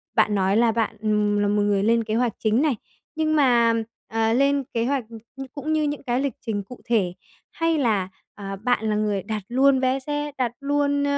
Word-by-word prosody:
bạn 215 -2 +3
nói 195 +2 +2
là 230 -1 +4
bạn, 225 -1 -1
ừm, 210 -1 +1
là 205 - +2
một 205 0 +2
người 205 -1 +1
lên 230 +1 +3
kế 215 0 -2
hoạch 240 -2 +1
chính 220 +3 +2
này, 300 -4 +2 0.4
nhưng 310 0 +1
mà, 240 -5 +4 0.3
à, 225 0 +1
lên 275 +2 +2
kế 230 0 0
hoạch 270 -2 0
c 230 +3 -12
cũng 310 +2 -3
như 310 - +1
những 290 -1 -2
cái 250 +1 0
lịch 280 -4 -1
trình 205 -3 -2
cụ 250 +5 -12
thể? 205 -7 +1 0.4
Hay 330 -1 0
là, 210 -9 +1 0.3
à, 195 -1 -6
bạn 220 +1 0
là 210 - +1
người 210 -3 0
đặt 215 -3 -4
luôn 265 +2 +3
vé 260 +1 +1
xe, 295 +2 -3
đặt 245 -3 0
luôn, 285 0 +1
235 Hz, 215 wpm, -23 LUFS, 210-275 Hz, 0.4 s, là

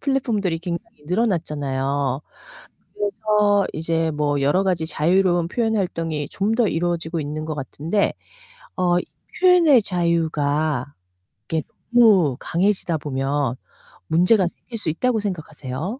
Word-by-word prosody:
플랫폼들이 225 - 0
굉장히 170 -3 -6
늘어났잖아요. 145 - -1 0.7
그래서 205 -1 +1
이제 165 +1 0
뭐 145 -1 0
여러 150 +8 +3
가지 175 -4 0
자유로운 175 +2 +2
표현 225 +2 0
활동이 165 -6 -2
좀 205 +3 0
더 230 -2 +2
이루어지고 170 -1 -1
있는 150 +1 -4
것 155 - -3
같은데 150 +8 -1 0.6
어 175 -1 +2
이 - - -14
표현의 340 -9 +6
자유가 155 -6 0 0.5
이게 160 +2 -2 0.3
너무 195 - +5
강해지다 180 -2 0
보면 135 -2 -1 0.5
문제가 180 +4 +4
생길 230 +6 -9
수 190 - -2
있다고 225 +8 0
생각하세요? 160 - -5
170 Hz, 295 characters per minute, -22 LUFS, 150-205 Hz, 0.7 s, 표현의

